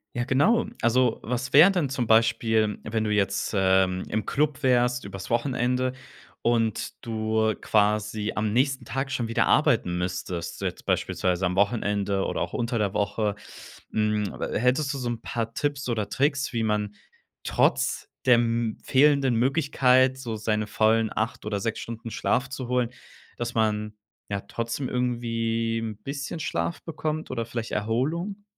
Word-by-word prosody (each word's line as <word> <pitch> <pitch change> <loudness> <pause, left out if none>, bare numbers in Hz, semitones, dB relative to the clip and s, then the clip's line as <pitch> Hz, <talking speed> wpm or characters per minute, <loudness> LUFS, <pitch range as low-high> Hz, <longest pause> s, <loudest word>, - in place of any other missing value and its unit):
Ja, 120 - 0
genau. 145 - +3 0.2
Also, 120 0 +2
was 125 +2 -3
wäre 155 +7 +9
denn 175 -8 0
zum 125 -3 -2
Beispiel, 110 -1 +3
wenn 110 0 -1
du 105 - -1
jetzt, 100 0 0
ähm, 95 -1 +3
im 110 0 -1
Club 145 -1 0
wärst 125 -2 +2
übers 95 -1 -7
Wochenende 125 +1 0 0.5
und 115 -2 -1
du 110 -1 0
quasi 105 0 +1
am 105 -1 0
nächsten 130 +1 +1
Tag 135 0 -3
schon 120 -3 -1
wieder 115 - +1
arbeiten 90 0 +3
müsstest, 90 -1 -4
jetzt - - -4
beispielsweise 90 0 0
am 90 0 0
Wochenende 100 -1 +1
oder - - -2
auch - - -3
unter 120 0 -1
der 100 -2 0
Woche? 105 0 0 0.6
Hm, 105 -1 0
a - - -2
hättest 130 +5 +1
du - - -4
so 125 -2 -3
'n 115 -1 -4
paar 115 -1 -3
Tipps 145 -1 -2
oder 110 -4 -1
Tricks, 140 +2 0
wie 115 -1 0
man 105 -1 -1 0.5
trotz - - +1 0.2
der 125 -2 +7
m 115 -1 0
fehlenden 135 -2 +4
Möglichkeit, 130 0 +3
so 120 -4 -5
seine 105 0 -1
vollen 110 +1 +2
8 110 0 -2
oder 105 -1 -1
6 115 +3 -2
Stunden 115 0 -7
Schlaf 125 +3 0
zu 130 -1 -5
holen, 125 -2 +1 0.5
dass 120 0 -3
man, 105 -1 0 0.4
ja, 100 -1 -2
trotzdem 115 +5 -4
irgendwie 115 -2 -1
'n 110 -2 -5
bisschen 140 +6 -5
Schlaf 85 - -2
bekommt 155 -1 -3
oder 115 -3 -2
vielleicht 115 0 -5
Erholung? 155 - -1
115 Hz, 155 wpm, -26 LUFS, 105-130 Hz, 0.6 s, wäre